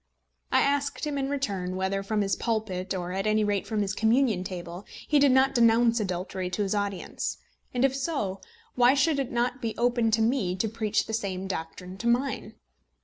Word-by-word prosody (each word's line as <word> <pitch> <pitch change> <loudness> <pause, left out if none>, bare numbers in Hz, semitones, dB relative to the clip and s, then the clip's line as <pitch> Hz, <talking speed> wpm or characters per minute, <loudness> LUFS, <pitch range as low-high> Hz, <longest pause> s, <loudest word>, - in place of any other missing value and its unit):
I - - +4
asked 280 +1 0
him 290 -2 -2
in 270 0 -1
return, 200 -10 -2
whether 190 +1 -1
from 210 +2 -1
his 195 -1 +1
pulpit, 195 -5 -2
or 180 -1 -4
at 195 +3 -2
any 215 0 +3
rate 205 -2 0
from 215 -2 0
his 200 0 -2
communion 220 -3 +2
table, 175 0 -6 0.2
he 295 - +4
did 280 -1 +5
not 265 +1 +4
denounce 235 -1 +4
adultery 185 -1 -3
to 205 +3 -1
his 195 - -1
audience; 200 -3 -3 0.3
and 250 +1 +2
if 270 -1 +1
so, 260 - -2 0.3
why 250 +2 +5
should 285 +1 +2
it 270 - -2
not 245 +1 -1
be 225 -3 -2
open 240 -1 +2
to 220 0 +2
me 220 -7 +1
to 205 +4 -1
preach 215 -1 0
the 220 - -6
same 195 -4 -2
doctrine 180 +1 -6
to 235 - -2
mine. 250 +3 0
220 Hz, 200 wpm, -27 LUFS, 190-250 Hz, 0.3 s, did